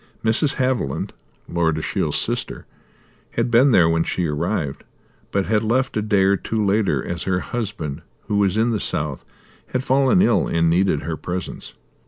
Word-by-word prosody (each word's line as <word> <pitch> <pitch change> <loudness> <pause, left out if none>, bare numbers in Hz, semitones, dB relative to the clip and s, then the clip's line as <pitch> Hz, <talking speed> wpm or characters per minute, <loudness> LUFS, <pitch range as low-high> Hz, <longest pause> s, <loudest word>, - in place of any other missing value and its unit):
Mrs. 135 +6 +2
Haviland, 125 - -1 0.4
Lord 80 -2 0
Ashiel's 80 - -1
sister, - - -2 0.7
had 120 +1 0
been 130 +4 +5
there 85 -7 +5
when 80 0 +2
she 90 - -1
arrived, 75 -2 -2 0.5
but 100 -1 0
had 105 -1 +2
left 130 +4 0
a 110 - +1
day 105 -2 +2
or 100 +1 +3
two 110 +1 -2
later 100 +1 +1
as 85 - -4
her 90 -1 0
husband, 100 -11 -4 0.3
who 105 -1 0
was 100 0 +2
in 115 +2 +2
the 110 - 0
south, 75 -6 -2 0.4
had 130 - -2
fallen 135 +5 +3
ill 120 - +3
and 85 0 +2
needed 90 -3 +2
her 80 -1 -3
presence. 90 +1 -6
100 Hz, 170 wpm, -21 LUFS, 85-115 Hz, 0.7 s, been